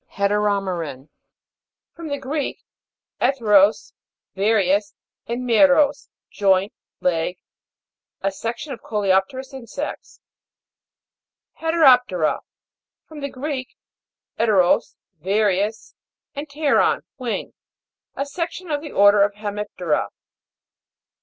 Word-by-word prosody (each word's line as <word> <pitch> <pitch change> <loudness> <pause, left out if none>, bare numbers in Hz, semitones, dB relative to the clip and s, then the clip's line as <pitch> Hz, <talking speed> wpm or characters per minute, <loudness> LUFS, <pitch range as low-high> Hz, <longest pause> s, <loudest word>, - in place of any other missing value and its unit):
HETEROME'RAN. 195 -8 -1 0.8
From 335 -1 -8
the 285 -1 -2
Greek, 280 +1 -4 0.6
'eteros, 210 -6 +3 0.4
various, 200 0 +1 0.3
and 245 +2 -3
meros, 280 +4 +4 0.2
joint, 195 0 +2 0.3
leg. 175 0 0 0.8
A 195 - 0
section 240 +9 -5
of 240 - -10
coleop'terous 210 +6 0
insects. 265 +3 -7 1.4
HETEROP'TERA. 250 - +4 0.7
From 310 -1 -10
the 280 0 -4
Greek, 260 -1 -5 0.6
'eteros, 200 -6 +3 0.3
various, 205 +3 0 0.4
and 285 +2 -6
pteron, 290 0 +2 0.2
wing. 245 -3 -4 0.6
A 275 - -2
section 340 +3 -5
of 290 -1 -1
the 300 - -8
order 205 0 +5
Hemip'tera. 205 -6 -2
220 Hz, 85 wpm, -22 LUFS, 195-280 Hz, 1.4 s, order